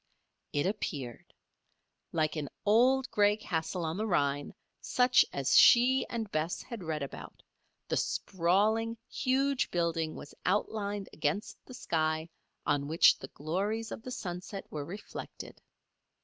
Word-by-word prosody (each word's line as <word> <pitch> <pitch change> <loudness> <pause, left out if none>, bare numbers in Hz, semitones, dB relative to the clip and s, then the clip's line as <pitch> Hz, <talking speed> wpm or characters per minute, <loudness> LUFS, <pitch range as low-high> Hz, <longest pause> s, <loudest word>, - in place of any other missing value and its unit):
It 145 - 0
appeared. 145 - -4 0.8
Like 155 -1 0
an 150 -3 -3 0.2
old, 250 +5 +4
gray 205 0 +3
castle 170 -3 -2
on 160 +2 -2
the 215 +2 -1
Rhine, 145 -6 0 0.3
such 250 0 +4
as 140 -1 +1
she 255 +2 +6
and 225 -3 -4
Bess 155 +3 -1
had 230 -6 -7
read 155 -3 -2
about, 140 - -9 0.4
the - - 0
sprawling, 210 +6 +1
huge 270 +1 +1
building 165 -2 -1
was 145 - -10
outlined 205 +1 -1
against 210 +2 -2
the 255 - -9
sky 160 -4 -1 0.3
on 145 -1 +1
which 160 +3 +5
the 130 - -7
glories 200 +11 -3
of - - -6
the 255 - -8
sunset 185 -3 -5
were 150 -2 -4
reflected. 195 +6 -9
185 Hz, 135 wpm, -31 LUFS, 155-220 Hz, 0.8 s, she